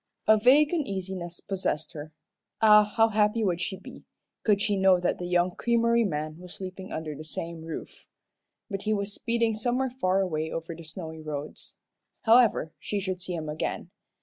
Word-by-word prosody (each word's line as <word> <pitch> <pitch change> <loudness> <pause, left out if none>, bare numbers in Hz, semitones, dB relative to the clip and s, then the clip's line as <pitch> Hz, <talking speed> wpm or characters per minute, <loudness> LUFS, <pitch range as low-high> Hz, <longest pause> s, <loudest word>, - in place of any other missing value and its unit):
A 220 - +7
vague 275 +8 +5
uneasiness 190 - -3
possessed 185 -5 -2
her. 155 0 -8 0.5
Ah, 210 -1 +8
how 225 +2 +3
happy 215 +1 +2
would 175 -4 0
she 190 +2 -3
be, - - -12 0.4
could 210 -2 +3
she 205 0 +1
know 190 -1 +5
that 175 - 0
the 175 - -4
young 175 0 +2
creamery 235 +3 +2
man 155 -2 -3
was 180 0 -7
sleeping 190 0 -7
under 155 -1 -4
the 150 +2 -8
same 165 +2 -5
roof! 160 -1 -8 0.6
But 195 -3 -4
he 215 +1 0
was 200 0 -1
speeding 230 0 0
somewhere 245 +4 0
far 195 -7 +1
away 160 -4 -1
over 165 +1 -4
the 165 - -10
snowy 160 0 -7
roads. 150 -1 -6 0.5
However, 225 -8 +4
she 205 - -2
should 185 -2 -3
see 180 -1 -3
him 160 -2 -4
again. 150 +1 -3
190 Hz, 175 wpm, -27 LUFS, 165-215 Hz, 0.6 s, Ah